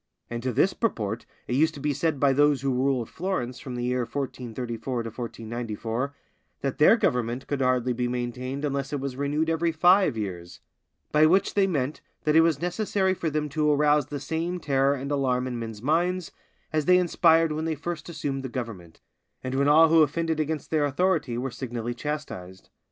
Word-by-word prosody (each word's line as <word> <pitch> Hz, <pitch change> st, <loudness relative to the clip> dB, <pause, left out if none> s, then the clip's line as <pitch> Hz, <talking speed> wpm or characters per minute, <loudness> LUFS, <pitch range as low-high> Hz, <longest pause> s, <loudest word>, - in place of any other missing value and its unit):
And 120 Hz, 0 st, -3 dB
to 130 Hz, +1 st, -1 dB
this 185 Hz, -, +2 dB
purport 110 Hz, -, -2 dB, 0.2 s
it -, -, -2 dB
used 155 Hz, +4 st, +2 dB
to -, -, -8 dB
be 145 Hz, +1 st, 0 dB
said 145 Hz, 0 st, -1 dB
by 140 Hz, 0 st, +4 dB
those 145 Hz, -1 st, +3 dB
who 135 Hz, -1 st, +1 dB
ruled 130 Hz, -2 st, +1 dB
Florence 165 Hz, -9 st, -3 dB
from 130 Hz, -2 st, -7 dB
the 120 Hz, -, -3 dB
year 125 Hz, +1 st, 0 dB
1434 120 Hz, -2 st, -4 dB
to 115 Hz, -, -5 dB
1494, 115 Hz, +2 st, -4 dB, 0.5 s
that 135 Hz, +1 st, -3 dB
their 195 Hz, +10 st, +7 dB
government 125 Hz, -, 0 dB
could 140 Hz, -2 st, -2 dB
hardly 125 Hz, -1 st, +2 dB
be 125 Hz, +1 st, -1 dB
maintained 125 Hz, +3 st, -3 dB
unless 140 Hz, -1 st, -2 dB
it 145 Hz, -, -2 dB
was 135 Hz, -1 st, -4 dB
renewed 145 Hz, +3 st, 0 dB
every 165 Hz, +1 st, +1 dB
five 175 Hz, -, +4 dB
years; 90 Hz, -5 st, -5 dB, 0.5 s
by 155 Hz, +1 st, +5 dB
which 190 Hz, +4 st, +3 dB
they 200 Hz, -1 st, +3 dB
meant 145 Hz, -5 st, -2 dB, 0.2 s
that 150 Hz, 0 st, +2 dB
it 160 Hz, -, +8 dB
was 165 Hz, -4 st, +2 dB
necessary 190 Hz, +2 st, 0 dB
for 170 Hz, -3 st, -2 dB
them 150 Hz, 0 st, -1 dB
to 150 Hz, +1 st, +1 dB
arouse 150 Hz, -1 st, +3 dB
the 145 Hz, -1 st, -5 dB
same 165 Hz, +5 st, -3 dB
terror 140 Hz, -2 st, +2 dB
and 140 Hz, +1 st, -5 dB
alarm 130 Hz, -3 st, +1 dB
in 125 Hz, -2 st, -4 dB
men's 115 Hz, -2 st, -7 dB
minds, 175 Hz, +4 st, 0 dB, 0.4 s
as 155 Hz, -2 st, +1 dB
they 180 Hz, 0 st, +6 dB
inspired 165 Hz, -2 st, +4 dB
when 155 Hz, +1 st, -2 dB
they 160 Hz, -1 st, -1 dB
first 165 Hz, +2 st, -5 dB
assumed 145 Hz, -4 st, -3 dB
the 130 Hz, -, -5 dB
government, 110 Hz, -10 st, -7 dB, 0.4 s
and 130 Hz, 0 st, -3 dB
when 140 Hz, +1 st, +2 dB
all 160 Hz, +2 st, +7 dB
who 165 Hz, 0 st, +6 dB
offended 160 Hz, +2 st, +1 dB
against 155 Hz, -1 st, -2 dB
their 155 Hz, -2 st, +2 dB
authority 145 Hz, -4 st, 0 dB
were 130 Hz, +1 st, -3 dB
signally 120 Hz, -2 st, -4 dB
chastised. 120 Hz, -10 st, -6 dB
140 Hz, 195 wpm, -26 LUFS, 125-160 Hz, 0.5 s, it